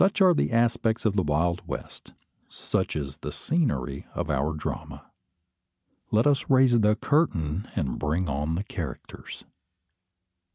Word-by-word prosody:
Such 195 +2 +3
are 185 -2 +6
the 150 - 0
aspects 115 -1 +1
of 105 -2 +2
the 95 - +3
wild 85 +2 0
west; - - -8 0.4
such - - -2
is 70 -1 -4
the 75 - -6
scenery 70 - -1
of 85 -3 -2
our 70 +3 0
drama. 75 - -6 1.0
Let 110 +2 +3
us 145 -2 +2
raise 130 -3 +5
the 105 0 +4
curtain, 100 - 0
and 65 -5 -2
bring 80 +5 0
on 75 +3 -1
the 95 - -2
characters. 85 -9 -7
90 Hz, 140 wpm, -26 LUFS, 75-120 Hz, 1.0 s, are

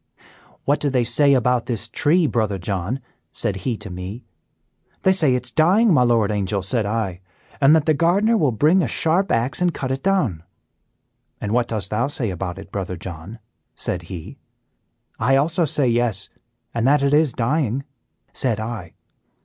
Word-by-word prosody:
"What 145 +2 +2
do 145 - 0
they 130 -2 +1
say 140 +4 +5
about 125 -1 +1
this 115 -2 -3
tree, 165 +8 +2
Brother 110 -8 0
John?" 95 +7 -3 0.3
said 100 - -2
he 115 +5 -2
to 100 - -9
me. 90 +7 -7 0.8
"They 190 - +5
say 155 -9 +3
it 125 - -3
is - - -4
dying, 190 +7 +4
my 145 - +4
Lord 115 -4 +3
Angel," 100 -1 -1
said 105 +2 0
I, 100 -4 -2 0.4
"and 140 +3 +6
that 155 -2 +2
the 155 - +3
gardener 190 +9 +2
will 150 - +2
bring 155 - +3
a 150 - 0
sharp 170 - +1
axe 125 +8 0
and 175 -3 +1
cut 130 -1 -3
it 135 +1 -2
down." 155 - 0 1.0
"'And 105 - -4
what 120 +1 +1
dost 105 -4 -3
thou 120 +4 +1
say 125 -7 -3
about 90 0 -5
it, 95 - -11
Brother 95 -2 -4
John?' 85 +4 -8 0.4
said 90 - -2
he." 85 -4 -8 0.8
"'I 130 +5 +3
also 160 +5 +2
say 145 -3 0
yes, 115 -4 0 0.4
and 115 +1 0
that 140 0 +4
it 140 0 +2
is 150 -3 +3
dying,' 135 +1 0 0.5
said 115 -5 -1
I." 110 -6 -6
120 Hz, 180 wpm, -21 LUFS, 105-150 Hz, 1.0 s, and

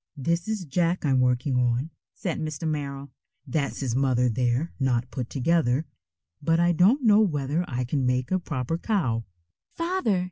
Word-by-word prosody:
"This 170 +6 -1
is 215 -4 -2
Jack 170 +3 0
I'm 135 -2 +3
working 125 +1 +1
on," 125 +5 0 0.2
said 175 -5 -3
Mr. 155 0 -3
Merrill. 140 -2 -4 0.3
"That's 140 +1 -2
his 125 -4 -1
mother 125 -2 +2
there, 125 +6 0
not 125 -2 0
put 125 -3 -4
together, 145 0 +1 0.6
but 165 +3 +2
I 175 0 +4
don't 200 - +4
know 215 -2 +6
whether 150 -4 0
I 125 -4 -2
can 130 +1 -1
make 125 +3 0
a 185 - +2
proper 155 -1 -3
cow." 130 - 0 0.5
"Father!" 335 - 0
145 Hz, 165 wpm, -26 LUFS, 125-170 Hz, 0.6 s, know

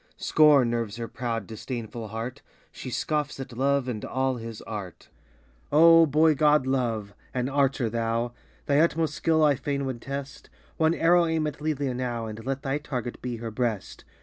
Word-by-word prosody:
Scorn 145 -6 +5
nerves 115 -3 -2
her 115 -1 -5
proud, 115 -3 -3
disdainful 115 +1 -6
heart! 115 +5 -6 0.3
She 130 - -8
scoffs 150 +2 -2
at 135 -2 -7
Love 140 +1 +1
and 115 -4 -4
all 130 -1 -1
his 115 -1 -8
art! 100 -5 -7 0.6
Oh, 165 +2 +7
boy 155 +2 +4
god, 150 -1 +3
Love! 115 -6 -1 0.2
An 125 0 0
archer 135 -3 +1
thou! 115 +1 -1 0.3
Thy 145 0 +3
utmost 165 -1 +2
skill 160 +1 +2
I 150 -1 +5
fain 140 +1 -2
would 130 -3 -4
test; 140 +1 -7 0.3
One 160 +1 +3
arrow 170 +1 +4
aim 160 -1 0
at 150 -1 -5
Lelia 145 -4 -1
now, 120 -2 -3
And 110 0 -7
let 135 +2 -3
thy 135 +2 -1
target 125 -5 -5
be 125 -1 -3
her 115 0 -6
breast 110 -3 -3
130 Hz, 175 wpm, -26 LUFS, 115-150 Hz, 0.6 s, Oh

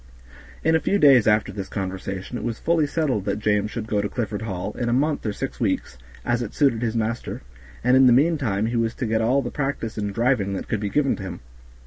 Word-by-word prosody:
In 160 0 +3
a - - +4
few 200 - +1
days 135 - +6
after 105 -1 +3
this 100 -1 -6
conversation 95 +2 -5
it - - -4
was 115 -2 -2
fully 165 -2 +1
settled 140 - -1
that 100 -1 -1
James 105 -1 +1
should 110 0 -5
go 105 -2 0
to 105 - -2
Clifford 110 -4 -3
Hall, 100 -2 -4
in 120 -1 0
a - - +1
month 145 +4 +1
or - - 0
six - - -5
weeks, 65 - -1 0.3
as 120 0 +1
it 115 - -5
suited 135 -6 +2
his 115 -1 -1
master, 115 - -3 0.4
and 125 +2 +4
in 130 0 +7
the - - +6
meantime 130 -7 +2
he 115 +2 -2
was 115 0 0
to 125 - -3
get 110 0 +1
all 130 +5 +2
the 120 - -4
practice 135 -6 -3
in 105 -1 -2
driving 115 -2 +1
that 95 - -4
could 110 - -1
be 105 -1 -2
given 140 +3 +1
to - - -8
him. 95 -2 -6
115 Hz, 245 wpm, -23 LUFS, 105-130 Hz, 0.4 s, in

